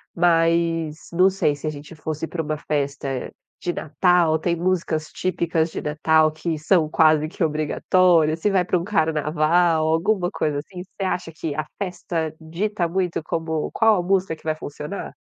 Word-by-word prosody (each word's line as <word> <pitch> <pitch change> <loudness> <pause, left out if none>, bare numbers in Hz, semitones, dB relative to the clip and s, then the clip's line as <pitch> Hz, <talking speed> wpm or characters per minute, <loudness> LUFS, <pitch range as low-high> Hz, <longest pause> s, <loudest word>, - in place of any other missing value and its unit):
mas 165 -2 +2 0.2
não 185 +3 +4
sei 170 -6 +1
se 145 - -10
a 155 - 0
gente 150 +2 -10
fosse 155 +1 -4
pra 165 -1 -3
uma 155 0 -2
festa 140 -3 -3 0.3
de 175 - -2
Natal. 170 +1 +2
Tem 170 +2 0
músicas 170 -3 -1
típicas 170 -2 -1
de - - -5
Natal 155 +1 +2
que 155 0 -3
são 160 0 +3
quase 155 0 +3
que 180 +2 -3
obrigatórias? 160 +1 +2
Se 205 - +2
vai 190 -2 +3
pra 180 +1 +1
um 170 - -3
carnaval 160 -2 +2
alguma 175 +3 +1
coisa, 150 -7 -1
assim. 180 +4 -8
Você 195 +1 -8
acha 180 -2 -3
que 155 -2 -4
a 155 -1 -2 0.2
festa 170 -4 -3
dita 175 +4 -2
muito 180 -1 -1
como 160 -1 -2
qual 225 -1 +4
a - - -1
música 190 -2 +1
que 155 - -23
vai 155 - 0
funcionar? 150 +4 -7
165 Hz, 175 wpm, -22 LUFS, 155-180 Hz, 0.3 s, não